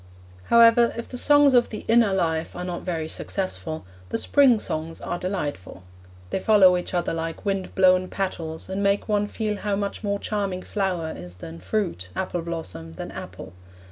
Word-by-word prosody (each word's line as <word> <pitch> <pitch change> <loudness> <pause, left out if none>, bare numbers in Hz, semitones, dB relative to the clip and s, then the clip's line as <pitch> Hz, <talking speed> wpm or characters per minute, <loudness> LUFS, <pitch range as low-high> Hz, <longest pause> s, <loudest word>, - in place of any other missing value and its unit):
However, 235 0 +6
if 235 - -5
the - - -8
Songs 290 +1 +5
of 245 -1 +4
the 215 - -7
Inner 230 -2 +4
Life 165 -4 -1
are 180 - -4
not 180 -1 -4
very 165 -3 -3
successful, 160 - -4 0.2
the - - -1
Spring 270 -5 +4
Songs 165 -5 -4
are 175 - -4
delightful. 145 - -4 0.5
They - - 0
follow 190 -3 +6
each 180 +1 -3
other 175 - 0
like 165 +2 -4
wind 195 -2 -2
blown 185 -1 +4
petals, 165 -5 -3
and 190 +1 -3
make 200 0 +1
one 205 -1 +1
feel 210 -1 -3
how 205 0 -1
much 200 +1 -3
more 200 -1 0
charming 200 -3 -3
flower 185 -6 -2
is 90 0 -9
than 85 -2 -9
fruit, 95 - -2
apple 180 -2 -2
blossom 95 - -6
than - - -7
apple. - - -9
185 Hz, 175 wpm, -24 LUFS, 165-210 Hz, 0.5 s, However